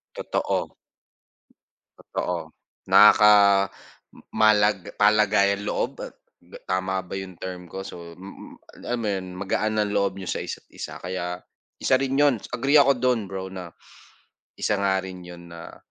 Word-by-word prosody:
Totoo. - - -2 1.2
Totoo. - - -4 0.4
Nakaka 100 -2 +6 0.6
malag 105 -3 +3
palagay 105 -1 +3
ang 100 - -7
loob? - - -1 0.7
Tama 95 0 -1
ba - - -10
'yong 95 -2 -7
term 90 -2 -7
ko? 95 0 -6
So, 85 -1 -10
mm, 95 +2 -13
lam 120 - -2
mo 110 - -3
yun, 95 -2 -2
magaan 110 +2 -1
ang 105 -1 0
loob 100 -1 0
n'yo 95 - -7
sa - - -2
isa't - - -8
isa, - - -7
kaya 90 -1 -4 0.4
isa 130 - +3
rin 135 +1 0
yun, 145 -4 +4 0.2
agree 135 +4 +1
ako 140 0 +5
dun 120 -5 +1
bro 95 0 -5
na, 90 -3 -8 0.9
isa 105 - 0
nga 95 -1 +1
rin 95 -1 -8
yun 85 -1 -12
na, 85 - -10
100 Hz, 145 wpm, -24 LUFS, 95-105 Hz, 1.2 s, Nakaka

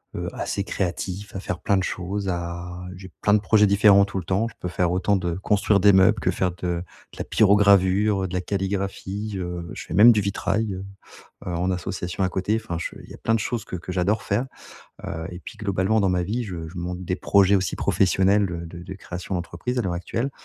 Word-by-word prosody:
heu, - - -3
assez 100 - -2
créatif, 95 +2 -4
à - - -3
faire 90 -2 -4
plein 100 - +1
de 95 - +2
choses, 95 +2 -3
à 85 +1 -4
j'ai 95 -1 -11
plein 105 - +3
de 105 - +5
projets 105 0 +4
différents 100 0 +6
tout 100 -1 -4
le - - -6
temps, 95 +6 0
je - - -10
peux - - -4
faire 90 0 0
autant 95 +3 +2
de 90 -3 -1
construire 100 +1 +2
des 100 +2 +6
meubles 95 +3 +5
que - - 0
faire 90 -1 0
de 90 - -15
de 85 0 -1 0.3
la - - -3
pyrogravure, 100 -1 +4
heu, - - -1
de 90 - -9
la 90 - 0
calligraphie, 100 +2 -3
heu, 90 -2 -5
je - - -7
fais - - -7
même 110 +5 +9
du 110 -3 +2
vitrail, 100 +2 -1
heu 95 - -6 0.6
heu, - - -3
en 90 +2 0
association 90 0 -3
à - - +2
côté 100 +5 0
enfin 85 -6 -4
je 85 - -5
il - - -15
y - - -9
a - - -11
plein 115 - +1
de - - +2
choses 120 -4 -2
que 90 - -5
que 90 +1 -7
j'adore 95 +4 +1
faire. 125 - -1 0.6
Heu, 80 0 -4
et 90 0 -8
puis - - -10
globalement 100 +1 +1
dans 100 -2 +2
ma 90 -1 +1
vie 110 +7 -2
je 85 -6 -6
je 85 - -12
monte 90 +1 -4
des 90 +1 -1
projets 100 -1 +4
aussi 95 -4 -1
professionnels 100 +2 +3
de 85 -2 -5
de - - -9
de 95 - -8
création 90 0 -6
d'entreprise 90 +8 -3
à - - +1
l'heure 95 -4 -2
actuelle. 115 +9 -2
95 Hz, 240 wpm, -24 LUFS, 90-100 Hz, 0.6 s, même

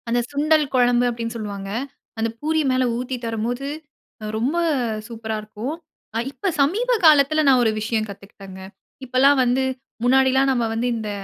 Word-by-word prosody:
அந்த 240 +1 +2
சுண்டல் 305 +1 +2
குழம்பு 245 -1 +3
அப்படின்னு 230 0 -4
சொல்லுவாங்க. 200 -3 -6 0.5
அந்த 225 +1 0
பூரி 315 +1 0
மேல 255 0 +2
ஊத்தி 255 +1 -3
தரும்போது 230 +4 -3 0.7
ரொம்ப 255 +8 0 0.5
சூப்பரா 225 -2 -5
இருக்கும். 215 +7 -6 0.6
இப்ப 390 +7 -2
சமீப 420 - +1
காலத்தில 310 0 +5
நான் 260 -2 +5
ஒரு 220 - +3
விஷயம் 220 0 -1
கத்துக்கிட்டேங்க. 195 -1 -11 0.4
இப்பலாம் 265 +3 +4
வந்து 250 +2 +1 0.4
முன்னாடிலாம் 265 +1 +4
நம்ம 245 -3 +1
வந்து 230 +2 -1
இந்த 220 -2 -4
245 Hz, 140 wpm, -22 LUFS, 225-275 Hz, 0.7 s, காலத்தில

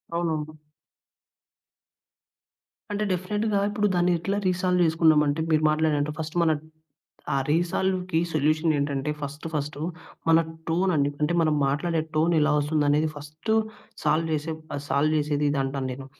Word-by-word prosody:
అవునవును. 155 -2 -2 2.3
అంటే, 205 +1 -1
డెఫినిట్‌గా 205 +4 -1
ఇప్పుడు 205 0 +1
దాన్ని 175 0 +3
ఎట్లా 200 +4 -2
రీసాల్వ్ 180 0 +1
చేసుకున్నాం 160 -1 +4
అంటే, 145 +2 0
మీరు 155 -1 +2
మాట్లాడినట్టు 155 -1 +1
ఫస్ట్ 160 +1 -5
మన 165 -1 +3 0.8
ఆ - - +2
రీసాల్వ్‌కి 180 +2 0
సొల్యూషన్ 155 +2 +2
ఏంటంటే 140 0 -1
ఫస్టు 145 +2 -6
ఫస్టు 145 -1 -3 0.5
మన 165 0 +6 0.3
టోన్ 180 +4 +1
అండి. 140 -1 +2
అంటే 150 +3 +1
మనం 155 -1 +2
మాట్లాడే 160 +4 0 0.2
టోన్ 165 +2 +3
ఎలా 150 0 +3
వస్తుంది 150 +1 +1
అనేది 150 +2 +3
ఫస్టు 155 +9 -3 0.5
సాల్వ్ 165 +1 +1
చేసే 155 +2 -2 0.2
ఆహ్, 140 - -5
సాల్వ్ 150 +3 +2
చేసేదిదంటాను 145 -2 0
నేను. 135 +1 -8
155 Hz, 135 wpm, -25 LUFS, 145-175 Hz, 2.3 s, మన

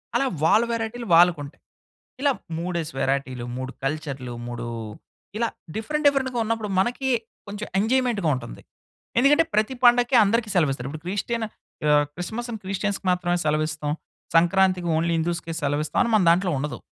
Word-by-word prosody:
అలా 275 - +3 0.2
వాళ్ళ 215 +8 +5
వేరైటీలు 230 0 -3
వాళ్ళకి 170 -2 +6
ఉంటాయి. 140 - -12 0.6
ఇలా 280 -1 +3 0.3
మూడేసి 170 -2 -3
వేరైటీలు, 135 -3 -1
3 130 0 -4
కల్చర్లు, 135 -4 -3
మూడు 120 0 -5 0.7
ఇలా 230 0 +1 0.3
డిఫరెంట్, 300 +8 -2
డిఫరెంట్‌గా 265 -3 +2
ఉన్నప్పుడు 220 -1 -2
మనకి 250 +5 0 0.4
కొంచెం 210 +1 -5
ఎంజాయిమెంట్‌గా 230 -5 +1
ఉంటుంది. 120 -2 -7 0.6
ఎందుకంటే, 295 +5 +5
ప్రతి 215 +5 +1
పండగకి 245 +1 +5
అందరికి 220 +1 +1
సెలవు 155 -6 +3
ఇస్తారు. 135 0 -5
ఇప్పుడు 155 +2 -9
క్రిస్టియన్ 225 +4 -2 0.4
ఆహ్, 145 0 +5
క్రిస్మస్ 220 +7 -5
అని 220 - -6
క్రిస్టియన్స్‌కి 195 0 -2
మాత్రమే 175 0 +1
సెలవు 155 0 +2
ఇస్తాం, 150 -2 -3 0.4
సంక్రాంతికి 180 +1 +3
ఓన్లీ 170 +1 +1
హిందూస్‌కే 170 0 -2
సెలవు 145 +1 0
ఇస్తాం - - -1
అని 235 - -1
మన 205 - +3
దాంట్లో 180 +2 +3
ఉండదు. 150 +2 -4
185 Hz, 155 wpm, -24 LUFS, 155-230 Hz, 0.7 s, వాళ్ళకి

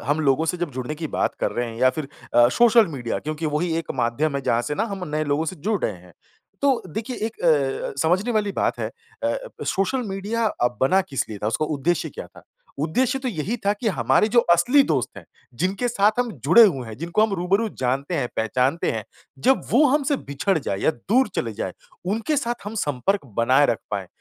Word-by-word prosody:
हम 145 +3 +1
लोगों 140 +1 +2
से 170 - 0
जब 175 -3 -3
जुड़ने 130 +4 -4
की 160 +1 -4
बात - - -1
कर - - +1
रहे 120 0 -2
हैं 115 - -9
या 130 0 +5
फ़िर 150 0 -5 0.3
अ, 120 0 +7
सोशल 230 - +5
मीडिया, 130 -8 -3
क्योंकि 155 +1 -4
वही 160 +3 0
एक 165 - -6
माध्यम 135 +4 0
है 140 - -3
जहाँ 120 -2 +1
से 135 +5 -3
ना 210 - 0
हम 185 -3 -5
नए 155 +1 -1
लोगों 145 +2 0
से 175 +3 -4
जुड़ 200 +5 -1
रहे - - 0
हैं। 90 -1 -15 0.5
तो 275 -3 +3
देखिए, 220 +8 -5
एक 225 +1 -4
अ, 145 -6 +1
समझने 185 +9 +2
वाली 210 -2 0
बात - - 0
है - - -2 0.3
अ, - - +1 0.3
सोशल 195 +6 0
मीडिया 205 +4 -2
अ, 120 - +1
बना 185 +9 +4
किस 140 -9 -3
लिए 105 -2 -7
था, - - 0
उसका 115 +7 0
उद्देश्य 155 +3 -1
क्या - - -8
था? - - -17 0.4
उद्देश्य 235 - +1
तो 260 -1 -3
यही 200 +2 -2
था 200 - +4
कि 215 +2 -2
हमारे 215 +1 +2
जो 240 - +8
असली 245 +12 +5
दोस्त - - +1
हैं - - -10 0.4
जिनके 195 +7 0
साथ 205 -2 +3
हम 245 -1 +1
जुड़े 235 - +8
हुए 135 - +1
हैं, 110 -1 -8
जिनको 170 +7 +1
हम 220 -2 +1
रूबरू 195 +5 +1
जानते 135 +6 -1
हैं, 135 -6 -1
पहचानते 130 +8 +1
हैं। - - -4 0.4
जब 265 +1 +4
वो 280 +6 +5
हमसे 285 +1 +2
बिछड़ 160 - -1
जाए 100 -9 -3
या - - +3
दूर 215 - +1
चले - - -1
जाए, - - -4 0.3
उनके 225 - -1
साथ 240 -4 0
हम 205 +2 -6
संपर्क 145 +5 -1
बनाए 130 +5 +4
रख 115 - 0
पाएँ। 100 -2 -3
165 Hz, 220 wpm, -23 LUFS, 135-215 Hz, 0.5 s, जो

